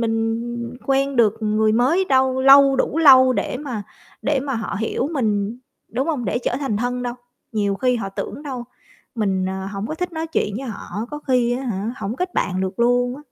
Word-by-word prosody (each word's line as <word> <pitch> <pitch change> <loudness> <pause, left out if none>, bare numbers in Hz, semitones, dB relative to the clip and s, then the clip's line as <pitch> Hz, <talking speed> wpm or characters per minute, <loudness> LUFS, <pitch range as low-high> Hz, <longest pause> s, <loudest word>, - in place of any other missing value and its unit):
mình 225 0 0 0.5
quen 275 0 +1
được 220 -1 +3
người 215 0 +2
mới 265 +12 +3
đâu 260 -4 +2
lâu 275 0 +7
đủ 305 - 0
lâu 260 -4 +7
để 250 - -2
mà 255 -7 -5 0.4
để 280 -3 +1
mà 275 -1 -3
họ 225 -3 -3
hiểu 225 +5 -1
mình, 215 -3 -1 0.3
đúng 260 +6 -2
hông? 275 -7 -1
Để 205 - 0
trở 245 0 -2
thành 250 -7 -1
thân 245 +2 -2
đâu. 245 -1 -3 0.4
Nhiều 205 -2 0
khi 250 +3 +1
họ 195 -4 -3
tưởng 235 +8 -6
đâu, 260 -5 -5 0.5
mình, 190 -4 0
à, 190 0 -4
hổng 200 +1 -4
có 310 - -4
thích 360 +1 -4
nói 320 0 -3
chuyện 210 -10 -1
với 265 +1 -5
họ, 220 0 -5
có 295 - -5
khi 245 -2 +3
á - - -6
hả, 220 -1 -3
hổng 220 +2 -4
kết 365 0 -3
bạn 185 0 0
được 190 +3 -3
luôn 245 +1 +2
á. - - -11
245 Hz, 210 wpm, -21 LUFS, 215-270 Hz, 0.5 s, lâu